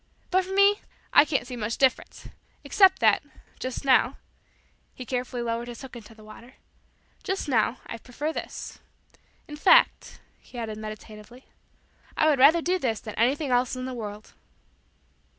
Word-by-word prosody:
But 370 Hz, 0 st, +2 dB
for 380 Hz, -, -6 dB
me 400 Hz, +1 st, +5 dB, 0.3 s
I -, -, +7 dB
can't 275 Hz, -5 st, -1 dB
see 250 Hz, 0 st, -7 dB
much 230 Hz, 0 st, -3 dB
difference 265 Hz, -2 st, 0 dB, 0.4 s
except 380 Hz, -2 st, +4 dB
that, -, -, +4 dB, 0.4 s
just 255 Hz, +2 st, -5 dB
now 260 Hz, -2 st, +3 dB, 0.4 s
" -, -, -39 dB
he 255 Hz, -, -8 dB
carefully 250 Hz, -1 st, -3 dB
lowered 235 Hz, +1 st, -3 dB
his 240 Hz, +2 st, -9 dB
hook 260 Hz, -2 st, -10 dB
into 225 Hz, -1 st, -12 dB
the 215 Hz, -, -16 dB
water 230 Hz, +4 st, -14 dB, 0.7 s
"just 385 Hz, -3 st, -3 dB
now, 245 Hz, -1 st, +1 dB
I 230 Hz, -, -8 dB
prefer 285 Hz, +7 st, -5 dB
this. -, -, -7 dB, 0.7 s
In 295 Hz, -, -9 dB
fact," -, -, +3 dB, 0.2 s
he 250 Hz, -, -14 dB
added 220 Hz, -2 st, -5 dB
meditatively, 215 Hz, +3 st, -10 dB, 0.7 s
"I 310 Hz, -, +3 dB
would 295 Hz, -4 st, +3 dB
rather 315 Hz, +5 st, +6 dB
do 365 Hz, +2 st, 0 dB
this 230 Hz, -, -1 dB
than 215 Hz, -, -8 dB
anything 265 Hz, +5 st, 0 dB
else 245 Hz, +1 st, +1 dB
in 255 Hz, 0 st, -5 dB
the 260 Hz, -, -5 dB
world." 210 Hz, -3 st, -8 dB
250 Hz, 165 wpm, -26 LUFS, 230-295 Hz, 0.7 s, I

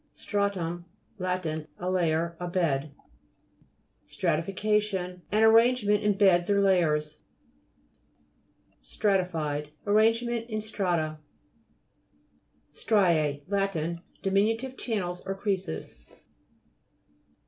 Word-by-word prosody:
STRA'TUM 180 Hz, -4 st, -2 dB, 0.3 s
Lat. 185 Hz, -1 st, -2 dB
A 160 Hz, +3 st, -4 dB
layer, 170 Hz, -2 st, 0 dB
a 180 Hz, -, -4 dB
bed. 155 Hz, -5 st, 0 dB, 1.2 s
STRATTFICA'TION 190 Hz, +1 st, -1 dB
An 215 Hz, +2 st, +3 dB
arrangement 225 Hz, -2 st, +4 dB
in 210 Hz, -2 st, +1 dB
beds 190 Hz, -2 st, +4 dB
or 200 Hz, 0 st, +3 dB
layers. 155 Hz, -6 st, +2 dB, 1.6 s
STRA'TIFIED 155 Hz, -, -1 dB, 0.2 s
Arranged 220 Hz, +3 st, +3 dB
in 235 Hz, -2 st, -3 dB
strata. 175 Hz, -8 st, -2 dB, 1.5 s
STRIPS 160 Hz, -9 st, +2 dB
Lat. 195 Hz, 0 st, 0 dB, 0.5 s
Diminutive 225 Hz, +7 st, +1 dB
channels 180 Hz, -8 st, -3 dB
or 195 Hz, 0 st, -3 dB
creases. 195 Hz, -, -3 dB
190 Hz, 80 wpm, -28 LUFS, 170-210 Hz, 1.6 s, arrangement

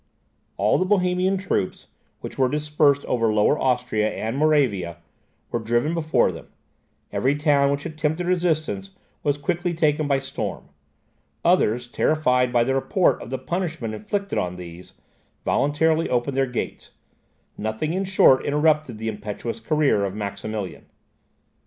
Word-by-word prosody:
All -, -, +2 dB
the -, -, +3 dB
Bohemian 185 Hz, -1 st, +2 dB
troops, 185 Hz, -, -2 dB, 0.4 s
which -, -, -7 dB
were 130 Hz, -1 st, +2 dB
dispersed 150 Hz, -1 st, +2 dB
over 115 Hz, -3 st, +1 dB
Lower 105 Hz, +7 st, +3 dB
Austria 125 Hz, -4 st, +1 dB
and 110 Hz, +3 st, -3 dB
Moravia, 130 Hz, -, +1 dB, 0.5 s
were 120 Hz, -, 0 dB
driven 120 Hz, +7 st, 0 dB
before 155 Hz, -, +2 dB
them; 80 Hz, -, -10 dB, 0.6 s
every 135 Hz, +3 st, +1 dB
town 145 Hz, -2 st, +3 dB
which 140 Hz, 0 st, -2 dB
attempted 155 Hz, +2 st, -2 dB
resistance 180 Hz, +2 st, -1 dB, 0.3 s
was 145 Hz, -1 st, 0 dB
quickly 175 Hz, +3 st, -1 dB
taken 155 Hz, -2 st, +1 dB
by 140 Hz, -1 st, +2 dB
storm; 135 Hz, 0 st, -5 dB, 0.8 s
others, 120 Hz, +3 st, +3 dB
terrified 125 Hz, -1 st, +1 dB
by 120 Hz, -1 st, +3 dB
the 135 Hz, +3 st, 0 dB
report 155 Hz, +7 st, +2 dB
of -, -, -8 dB
the 130 Hz, -, -2 dB
punishment 160 Hz, -, -3 dB
inflicted 200 Hz, -, -2 dB
on 90 Hz, 0 st, -2 dB
these, 90 Hz, 0 st, -10 dB, 0.5 s
voluntarily 160 Hz, +3 st, +2 dB
opened 125 Hz, +2 st, 0 dB
their 135 Hz, 0 st, +2 dB
gates; 125 Hz, -, -5 dB, 0.6 s
nothing 110 Hz, +9 st, -2 dB
in 190 Hz, +2 st, 0 dB
short 185 Hz, -8 st, +5 dB
interrupted 150 Hz, -4 st, +1 dB
the 110 Hz, +1 st, -5 dB
impetuous 110 Hz, +1 st, -5 dB
career 140 Hz, -4 st, +2 dB
of 100 Hz, 0 st, -3 dB
Maximilian. 100 Hz, -1 st, -5 dB
140 Hz, 140 wpm, -23 LUFS, 115-155 Hz, 0.8 s, short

